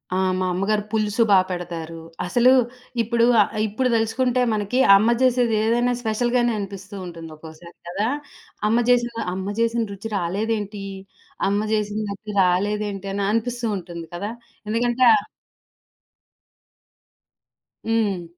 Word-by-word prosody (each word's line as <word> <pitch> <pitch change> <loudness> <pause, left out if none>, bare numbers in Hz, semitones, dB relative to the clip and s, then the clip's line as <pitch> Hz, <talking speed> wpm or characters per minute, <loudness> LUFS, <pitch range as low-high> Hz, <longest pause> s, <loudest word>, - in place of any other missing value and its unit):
ఆ! - - +1 0.2
మా 185 - 0
అమ్మగారు 205 +3 0
పులుసు 215 0 0
బా 195 - +7
పెడతారు. 165 -2 -5 0.2
అసలు 240 +8 +4 0.5
ఇప్పుడు, 235 +1 +2
ఆ - - +9 0.3
ఇప్పుడు 250 +5 0
దెలుసుకుంటే 250 +3 +1
మనకి 210 +4 -1 0.2
అమ్మ 220 +4 +2
చేసేది 245 -3 +3
ఏదైనా 240 +2 +2
స్పెషల్‌గానే 240 +2 +1
అనిపిస్తుంటుంది 190 -4 -7
ఒక్కోసారి 160 +2 -13
కదా! 200 +5 -1 0.6
అమ్మ 225 - +3
జేసిన, 240 -1 +3 0.2
అమ్మ 190 +1 -4
జేసిన 230 0 +1
రుచి 210 +3 -7
రాలేదేంటి? 205 +2 -2 0.6
అమ్మ 200 +1 +1
చేసిన 210 0 -1
రుచి 210 +1 -7
రాలేదేంటి? 200 +2 0
అని 200 0 -1
అనిపిస్తూ 240 +1 -1
ఉంటుంది 170 -2 -8
కదా! 205 +5 -4 0.4
ఎందుకంటా 240 +2 +3 2.8
హ్మ్. 195 -7 -1
210 Hz, 115 wpm, -22 LUFS, 190-235 Hz, 2.8 s, ఆ